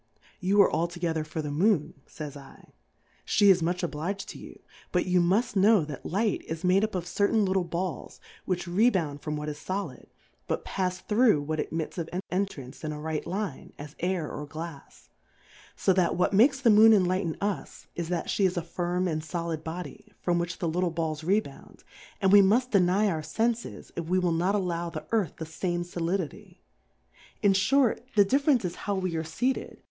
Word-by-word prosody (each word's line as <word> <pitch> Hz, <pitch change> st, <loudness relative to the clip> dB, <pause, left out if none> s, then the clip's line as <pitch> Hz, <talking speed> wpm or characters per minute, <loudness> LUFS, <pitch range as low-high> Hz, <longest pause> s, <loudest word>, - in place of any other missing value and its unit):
You 195 Hz, +1 st, +2 dB
are -, -, +1 dB
altogether 170 Hz, -1 st, -1 dB
for 155 Hz, +1 st, -5 dB
the 145 Hz, -, -4 dB
Moon, 170 Hz, -1 st, +2 dB
fays 150 Hz, -3 st, -7 dB
I^ 140 Hz, -2 st, -14 dB, 0.6 s
fhe 205 Hz, -1 st, +5 dB
is 180 Hz, -2 st, +3 dB
much 175 Hz, +2 st, -1 dB
oblig'd 175 Hz, +5 st, -3 dB
to -, -, -8 dB
you; -, -, -11 dB, 0.3 s
but 180 Hz, -, +1 dB
you 180 Hz, -1 st, +3 dB
muft 205 Hz, +7 st, +1 dB
know 200 Hz, -3 st, +5 dB
tiiat 145 Hz, -3 st, -7 dB
Light 205 Hz, +4 st, 0 dB
is 160 Hz, +2 st, -5 dB
made 185 Hz, +3 st, +4 dB
up 215 Hz, -2 st, -1 dB
of 175 Hz, -2 st, -2 dB
certain 200 Hz, +4 st, +2 dB
little 190 Hz, -1 st, +1 dB
Balls, 175 Hz, +1 st, -4 dB, 0.3 s
which 180 Hz, -1 st, -1 dB
rebound 175 Hz, -7 st, +1 dB
from 150 Hz, 0 st, -3 dB
what 150 Hz, 0 st, -5 dB
is 150 Hz, -1 st, -5 dB
Solid, 195 Hz, +2 st, -5 dB, 0.4 s
but -, -, -2 dB
pafs 185 Hz, -1 st, -2 dB
through 215 Hz, -, +3 dB
what 155 Hz, +1 st, -3 dB
admits 160 Hz, +3 st, -3 dB
of 165 Hz, -, -4 dB
an 180 Hz, -, -2 dB
entrance 180 Hz, -10 st, -3 dB
in 155 Hz, -, -2 dB
a 150 Hz, -, -6 dB
right 155 Hz, +1 st, -3 dB
Line, 190 Hz, -5 st, -4 dB
as 145 Hz, +1 st, -9 dB
Air 180 Hz, -3 st, -1 dB
or 150 Hz, 0 st, -6 dB
Glafs: 155 Hz, 0 st, -9 dB, 0.7 s
So 190 Hz, -, +2 dB
that 180 Hz, -2 st, +2 dB
what 180 Hz, +3 st, +1 dB
makes 265 Hz, +7 st, +5 dB
the 245 Hz, -4 st, +4 dB
Moon 220 Hz, +1 st, +8 dB
enlighten 185 Hz, -3 st, +1 dB
us, 200 Hz, -1 st, -4 dB
is 170 Hz, -1 st, -4 dB
that 175 Hz, -2 st, -2 dB
flie 200 Hz, -, +1 dB
is 180 Hz, 0 st, -4 dB
a 170 Hz, -, -1 dB
firm 175 Hz, +2 st, -1 dB
and 155 Hz, -2 st, -1 dB
folid 165 Hz, 0 st, -4 dB
Body, 170 Hz, +2 st, -7 dB
from 175 Hz, -1 st, +1 dB
which 175 Hz, +1 st, -3 dB
the 170 Hz, -, -2 dB
little 175 Hz, +2 st, 0 dB
Balls 160 Hz, -2 st, -3 dB
rebound; 200 Hz, +6 st, -2 dB, 0.4 s
and 190 Hz, -2 st, +3 dB
we 205 Hz, 0 st, +9 dB
muit 235 Hz, +6 st, +3 dB
deny 195 Hz, +1 st, +3 dB
our 160 Hz, -5 st, -1 dB
Senfes, 225 Hz, +8 st, -2 dB
if 170 Hz, -, -3 dB
we 180 Hz, +3 st, +1 dB
will 180 Hz, -2 st, +2 dB
not 175 Hz, +5 st, +1 dB
allow 175 Hz, -3 st, -1 dB
the 155 Hz, -2 st, -7 dB
Earth 215 Hz, -9 st, +1 dB
the 160 Hz, -, -5 dB
fame 175 Hz, +2 st, -2 dB
Solidity; 175 Hz, -1 st, -4 dB, 0.8 s
in 200 Hz, -1 st, +5 dB
fhort, 245 Hz, +6 st, +3 dB, 0.2 s
the 205 Hz, -1 st, +6 dB
Difference 275 Hz, 0 st, +2 dB
is 175 Hz, -, -2 dB
how 205 Hz, -, -3 dB
we 185 Hz, -3 st, -2 dB
are 160 Hz, -, -1 dB
feated, 245 Hz, +12 st, 0 dB
for -, -, -7 dB
the -, -, -16 dB
42. -, -, -27 dB
180 Hz, 200 wpm, -28 LUFS, 160-200 Hz, 0.8 s, we